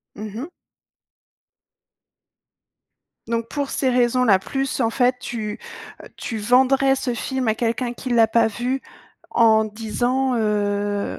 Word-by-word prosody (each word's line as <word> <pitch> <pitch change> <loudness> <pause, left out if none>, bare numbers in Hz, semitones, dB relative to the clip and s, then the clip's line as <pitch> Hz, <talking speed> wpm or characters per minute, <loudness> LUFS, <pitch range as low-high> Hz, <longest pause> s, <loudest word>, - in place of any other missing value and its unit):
Mmh 210 -1 -7
mh. 280 +9 -6 2.8
Donc 230 0 -2
pour 285 0 -3
ces 265 - 0
raisons-là 245 -4 +3
plus 270 +7 -3
en 225 -2 +2
fait, 250 +1 +2
heu, - - -30
tu 215 -3 -4 0.6
tu 225 - -5
vendrais 265 +4 +3
ce 250 -2 -2
film 260 +1 -2
à 220 - +3
quelqu'un 235 +2 -1
qui 255 +1 -7
l'a 230 -2 +5
pas 225 +1 +3
vu 245 +5 -2 0.5
en 220 -2 +4
disant, 240 +5 -1
heu,: 205 -2 -1
235 Hz, 130 wpm, -22 LUFS, 220-255 Hz, 2.8 s, l'a